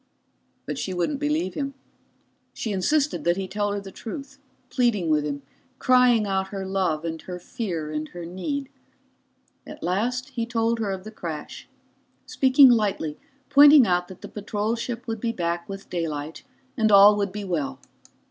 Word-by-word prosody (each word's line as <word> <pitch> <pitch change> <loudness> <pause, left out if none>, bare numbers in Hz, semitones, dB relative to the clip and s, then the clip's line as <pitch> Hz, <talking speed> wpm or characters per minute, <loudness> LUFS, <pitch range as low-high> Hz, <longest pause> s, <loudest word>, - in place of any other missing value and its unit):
But - - -4
she 185 - -3
wouldn't 270 +11 -1
believe 300 +3 -1
him. 275 -1 -4 0.8
She 220 - -3
insisted 285 +10 +1
that 175 +1 +2
he 190 -1 -3
tell 205 +1 -1
her 205 - -2
the 195 -1 -10
truth, 275 +6 -8 0.3
pleading 220 -9 +1
with 150 -1 +3
him, 145 -1 -4 0.3
crying 250 -3 +4
out 190 -1 -1
her 195 -1 -5
love 185 -5 -1
and 160 -1 -4
her 180 -1 -7
fear 175 -5 -4
and 155 0 -3
her 175 +1 -8
need. 270 - -4 1.0
At - - -10
last 245 +9 -1
he 235 -3 -3
told 230 0 0
her 215 -3 -1
of 190 -1 -4
the 215 - -9
crash, 165 -8 -7 0.6
speaking 265 0 +6
lightly, 200 -9 0 0.3
pointing 285 -2 +8
out 180 -2 +1
that 185 -1 -12
the - - -7
patrol 210 +2 -2
ship 235 0 -5
would 225 -2 -4
be 230 - 0
back 170 -4 -3
with 195 0 -7
daylight 160 -3 -4 0.3
and 220 -3 +2
all 200 +1 +8
would 200 -2 -1
be 205 +1 -5
well. 170 -8 -2
205 Hz, 170 wpm, -25 LUFS, 175-240 Hz, 1.0 s, pointing